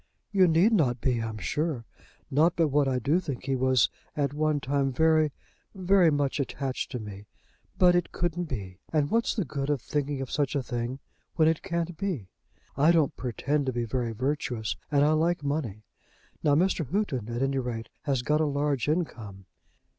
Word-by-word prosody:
"You 190 -3 +5
need 175 +7 +4
not 130 - +2
be, 120 -1 0
I'm 110 -1 -4
sure. 130 - -2 0.5
Not 160 +5 +3
but 165 -3 +2
what 145 0 +2
I 130 -1 +1
do 140 +8 +2
think 140 -9 -5
he 135 -1 0
was 130 -2 +3 0.3
at 140 -1 0
one 155 0 +1
time 140 0 0
very 155 +2 +3 0.4
very 185 -2 +4
much 145 -1 0
attached 135 -1 -3
to 125 - -2
me. 105 -1 -9 0.5
But 180 -1 +6
it 175 -1 +1
couldn't 175 0 -1
be. 95 - -6
And 150 -2 +1
what's 230 +1 +1
the 205 -6 -1
good 140 +1 -3
of 145 -2 +1
thinking 145 +2 -2
of 135 -1 -5
such 145 -2 0
a 140 - 0
thing 120 +1 -3 0.4
when 160 -2 +4
it 160 -1 +2
can't 170 -2 -3
be? 160 - -3 0.5
I 150 +5 +5
don't 160 -5 +2
pretend 135 +3 -1
to 130 - 0
be 120 0 -1
very 120 0 -2
virtuous, 125 -2 -2
and 145 -1 +3
I 150 - +4
like 160 +1 +1
money. 140 -8 -2 0.6
Now 145 -1 +3
Mr. 170 -2 +1
Houghton, 140 - -1
at 120 +2 -2
any 135 0 +1
rate, 115 -3 -4 0.2
has 135 -4 0
got 150 +3 +2
a - - +3
large 145 -3 0
income. 110 - -3
145 Hz, 190 wpm, -28 LUFS, 125-160 Hz, 0.6 s, But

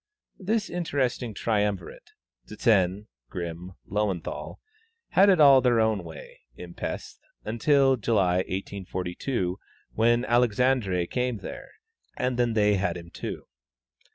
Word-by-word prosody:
This 215 +2 -1
interesting 130 - -2
triumvirate 105 -5 -2 0.4
Zsen, 105 -2 +1 0.2
Grimm, 85 +1 -6
Löwenthal 100 -4 -3 0.5
had 195 +2 +5
it 185 -4 +4
all 140 -3 +8
their 120 -2 +3
own 110 -4 +1
way, 80 -1 -11 0.2
in 85 +4 -10
Pesth, - - -6 0.3
until 135 +4 +3
July, 100 -6 +2
1842, 95 +1 -3 0.3
when 120 +2 +2
Alexandre 120 -6 +2
came 125 +4 -2
there, 270 - -9 0.5
and 125 -1 -1
then 120 -2 +2
they 105 -2 +3
had 100 -1 -1
him 85 0 -11
too. - - -6
110 Hz, 115 wpm, -26 LUFS, 95-125 Hz, 0.5 s, all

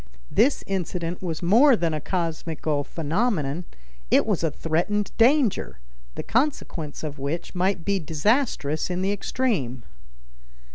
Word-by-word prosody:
This 270 +5 +3
incident 180 -2 -3
was 170 -3 -4
more 240 +10 +6
than 170 -5 0
a 155 - -2
cosmical 160 -4 -2
phenomenon; 165 - -1 0.4
it - - +4
was 205 -6 0
a 165 - +3
threatened 175 +8 -1
danger, 250 -1 +3 0.4
the - - -4
consequence 215 - -1
of 150 -2 -5
which 140 +5 -4
might 185 -1 0
be 200 -1 +1
disastrous 160 - 0
in 180 +1 -1
the 195 - +1
extreme. 190 - -1
175 Hz, 130 wpm, -25 LUFS, 155-210 Hz, 0.4 s, more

